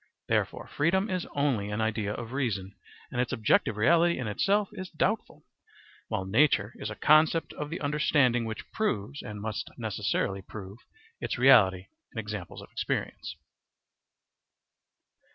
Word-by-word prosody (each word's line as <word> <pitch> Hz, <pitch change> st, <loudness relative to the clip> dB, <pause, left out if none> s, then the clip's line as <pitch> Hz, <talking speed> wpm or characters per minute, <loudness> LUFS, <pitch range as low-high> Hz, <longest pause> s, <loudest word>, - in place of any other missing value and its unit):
Therefore -, -, 0 dB
freedom 190 Hz, +7 st, +1 dB
is 185 Hz, -1 st, -2 dB
only 135 Hz, -8 st, +1 dB
an 105 Hz, +1 st, -3 dB
idea 110 Hz, -2 st, 0 dB
of 115 Hz, +2 st, -6 dB
reason, 105 Hz, -8 st, -2 dB, 0.4 s
and 125 Hz, -, 0 dB
its 125 Hz, -, -2 dB
objective 110 Hz, -2 st, +2 dB
reality 170 Hz, +9 st, +4 dB
in 125 Hz, -, -3 dB
itself 200 Hz, -, +1 dB
is 185 Hz, -1 st, -7 dB
doubtful; 195 Hz, +7 st, -2 dB, 0.6 s
while 95 Hz, -, -2 dB
nature 110 Hz, 0 st, +3 dB
is -, -, -4 dB
a -, -, -6 dB
concept 155 Hz, +2 st, +4 dB
of 150 Hz, 0 st, -5 dB
the 165 Hz, -, -4 dB
understanding 145 Hz, -5 st, +2 dB
which 110 Hz, -1 st, -6 dB
proves, 140 Hz, -, -2 dB
and 105 Hz, -1 st, -7 dB
must 110 Hz, 0 st, -4 dB
necessarily 95 Hz, 0 st, -1 dB
prove, 100 Hz, +2 st, -9 dB, 0.4 s
its -, -, -3 dB
reality 100 Hz, -8 st, +6 dB, 0.3 s
in -, -, -14 dB
examples 105 Hz, -5 st, -5 dB
of -, -, -14 dB
experience. -, -, -3 dB
120 Hz, 140 wpm, -29 LUFS, 105-155 Hz, 0.6 s, reality